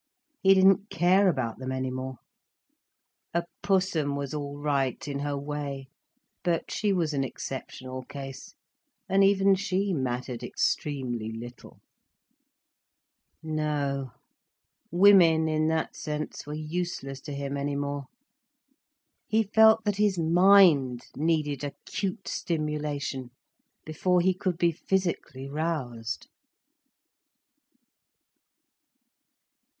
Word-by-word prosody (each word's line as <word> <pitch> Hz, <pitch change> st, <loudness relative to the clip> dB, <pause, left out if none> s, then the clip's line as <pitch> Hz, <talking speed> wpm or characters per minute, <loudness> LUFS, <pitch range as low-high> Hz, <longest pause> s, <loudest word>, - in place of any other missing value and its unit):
He 195 Hz, 0 st, +6 dB
didn't 195 Hz, +2 st, +4 dB
care 185 Hz, +3 st, +4 dB
about 125 Hz, -9 st, -2 dB
them 130 Hz, 0 st, -4 dB
any 130 Hz, 0 st, -2 dB
more. 130 Hz, +1 st, -5 dB, 1.2 s
A 170 Hz, -, +2 dB, 0.2 s
Pussum 185 Hz, -7 st, +1 dB
was 140 Hz, 0 st, -4 dB
all 145 Hz, -1 st, -4 dB
right 140 Hz, -2 st, -1 dB
in 140 Hz, -1 st, -3 dB
her 145 Hz, 0 st, -2 dB
way, 140 Hz, -2 st, -5 dB, 0.5 s
but 170 Hz, -2 st, -1 dB
she 210 Hz, -1 st, 0 dB
was 170 Hz, -5 st, 0 dB
an 135 Hz, -1 st, 0 dB
exceptional 130 Hz, -1 st, -6 dB
case, 135 Hz, -1 st, -9 dB, 0.5 s
and 195 Hz, +1 st, +4 dB
even 195 Hz, 0 st, +5 dB
she 195 Hz, 0 st, 0 dB
mattered 125 Hz, -3 st, -3 dB
extremely 125 Hz, -6 st, -2 dB
little. 120 Hz, +2 st, -10 dB, 1.6 s
No, 145 Hz, -4 st, -2 dB, 0.8 s
women, 175 Hz, -3 st, +6 dB
in 155 Hz, 0 st, +1 dB
that 160 Hz, 0 st, -1 dB
sense, 150 Hz, -1 st, -5 dB
were 150 Hz, -, -4 dB
useless 155 Hz, -4 st, -4 dB
to 150 Hz, -, -8 dB
him 140 Hz, 0 st, -3 dB
any 140 Hz, 0 st, -2 dB
more. 140 Hz, 0 st, -3 dB, 1.2 s
He 220 Hz, +1 st, +2 dB
felt 220 Hz, +1 st, +5 dB
that 205 Hz, -1 st, 0 dB
his 205 Hz, -3 st, +2 dB
mind 165 Hz, -7 st, +5 dB
needed 150 Hz, -2 st, 0 dB
acute 165 Hz, +8 st, -4 dB
stimulation, 150 Hz, -5 st, -3 dB, 0.6 s
before 180 Hz, +4 st, +1 dB
he 185 Hz, +2 st, +3 dB
could 180 Hz, -1 st, -2 dB
be 170 Hz, 0 st, +3 dB
physically 170 Hz, -6 st, -2 dB
roused. 140 Hz, -7 st, -3 dB
150 Hz, 105 wpm, -27 LUFS, 135-180 Hz, 1.6 s, He